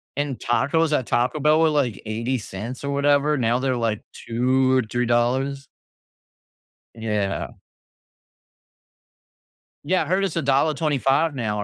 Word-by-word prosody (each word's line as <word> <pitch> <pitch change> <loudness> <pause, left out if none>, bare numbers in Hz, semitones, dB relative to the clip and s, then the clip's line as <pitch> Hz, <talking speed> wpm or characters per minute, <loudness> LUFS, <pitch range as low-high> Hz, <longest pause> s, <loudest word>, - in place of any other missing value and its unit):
and 145 -3 -2
tacos 150 +6 +1
at 125 - -4
Taco 125 +5 0
Bell 150 +2 +3
were, 160 -1 +4
like, 135 -9 0
$0.80 115 +1 -4
or 140 - -2
whatever, 145 +1 +2
now 120 0 +1
they're, 130 -1 0
like, 115 -3 -1
2, 130 +2 +1
$3. 125 +4 0 1.3
Yeah. 105 -3 -2 2.3
Yeah, 180 +2 +1
I - - -7
heard 185 +5 +1
it's 185 -4 -2
$1.25 145 0 +1
now, 105 -4 -2
130 Hz, 115 wpm, -23 LUFS, 120-145 Hz, 2.3 s, were